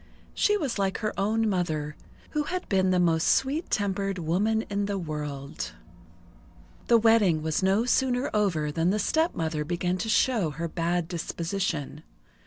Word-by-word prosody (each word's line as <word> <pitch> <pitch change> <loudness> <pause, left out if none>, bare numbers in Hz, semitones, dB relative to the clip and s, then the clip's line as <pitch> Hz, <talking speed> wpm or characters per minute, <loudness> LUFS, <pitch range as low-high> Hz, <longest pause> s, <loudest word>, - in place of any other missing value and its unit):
She 415 0 +2
was 275 - -2
like 195 -1 0
her 215 -2 -2
own 220 +3 +1
mother, 155 -6 -1 0.4
who 300 -1 -1
had 365 +3 -4
been 190 -2 +2
the 185 -1 +3
most 165 -2 +2
sweet 285 +6 +1
tempered 195 -1 -1
woman 200 +7 +1
in 200 0 -2
the 200 -1 -2
world. 150 -5 -5 1.1
The 235 - +6
wedding 215 -8 +4
was 160 +2 0
no 195 +4 +2
sooner 250 +1 +1
over 170 -8 +1
than 165 +3 +1
the 205 - +1
stepmother 170 - 0
began 175 +3 -1
to 220 - -3
show 220 -6 +2
her 165 +4 -4
bad 170 +1 -1
disposition. 165 -4 -3
190 Hz, 155 wpm, -27 LUFS, 165-220 Hz, 1.1 s, The